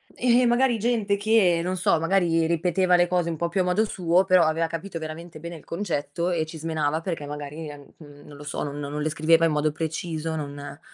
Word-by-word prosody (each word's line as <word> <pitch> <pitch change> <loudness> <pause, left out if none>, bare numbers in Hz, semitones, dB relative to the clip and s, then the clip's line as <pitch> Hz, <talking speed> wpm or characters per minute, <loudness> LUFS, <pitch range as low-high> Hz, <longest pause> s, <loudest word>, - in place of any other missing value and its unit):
Eh, 245 0 +3
magari 240 0 +3
gente 215 -3 +1
che, 205 -5 +3
non 185 +1 -1
so, 170 -2 +2
magari 165 -1 +2
ripeteva 180 +2 +2
le 175 0 +4
cose 175 -1 0
un 165 - -2
po' 170 +1 -1
più 185 - -1
a - - +2
modo 180 +4 +2
suo, 180 -2 +2
però 185 -2 +5
aveva 160 +1 +1
capito 165 +1 -6
veramente 160 +1 -8
bene 170 +1 -7
il 150 - -16
concetto 170 -2 -2
e 160 -2 0
ci 160 +1 -9
smenava, 155 -1 -1
perché 165 -4 -4
magari, 150 +2 -7
ehm, 145 -1 -11 0.4
non 145 -1 -12
lo 145 - -10
so, - - -4
non 145 0 -5
non 145 +1 -4
le 155 - 0
scriveva 160 +2 +3
in 165 - +2
modo 150 0 +1
preciso 160 0 -3
non 145 -1 -7
165 Hz, 220 wpm, -25 LUFS, 155-180 Hz, 0.4 s, però